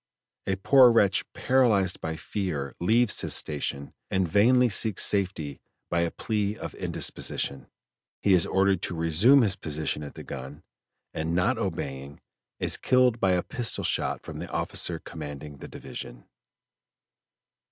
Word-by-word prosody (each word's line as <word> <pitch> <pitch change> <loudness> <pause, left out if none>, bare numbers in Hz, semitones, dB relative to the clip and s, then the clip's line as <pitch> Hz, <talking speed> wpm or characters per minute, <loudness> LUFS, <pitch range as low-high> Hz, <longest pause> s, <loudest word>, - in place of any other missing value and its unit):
A 95 - +1
poor 125 +6 +6
wretch 100 -5 +2
paralyzed 110 -8 +2
by 80 0 -3
fear 80 -7 -4
leaves 110 +5 +3
his - - -3
station 70 -2 -3 0.2
and 95 -2 +1
vainly 125 +8 +4
seeks 110 -1 +1
safety 90 -8 0 0.3
by 85 - +1
a 85 - +1
plea 105 +2 -2
of - - -7
indisposition; 70 - -3 0.6
he 100 - +4
is 90 -2 +4
ordered 95 -1 +2
to 90 - -2
resume 85 - +4
his 100 -3 +1
position 75 -4 -3
at 75 -1 -8
the - - -8
gun, 70 +2 -8 0.5
and 80 +1 -2
not 110 +7 +1
obeying, 70 -8 -5 0.4
is - - +2
killed 125 -2 +3
by 95 -3 +2
a 90 - +1
pistol 120 -6 -2
shot - - -1
from - - -8
the - - -6
officer - - -2
commanding 75 -1 -8
the - - -9
division. - - -9
95 Hz, 145 wpm, -27 LUFS, 75-110 Hz, 0.6 s, poor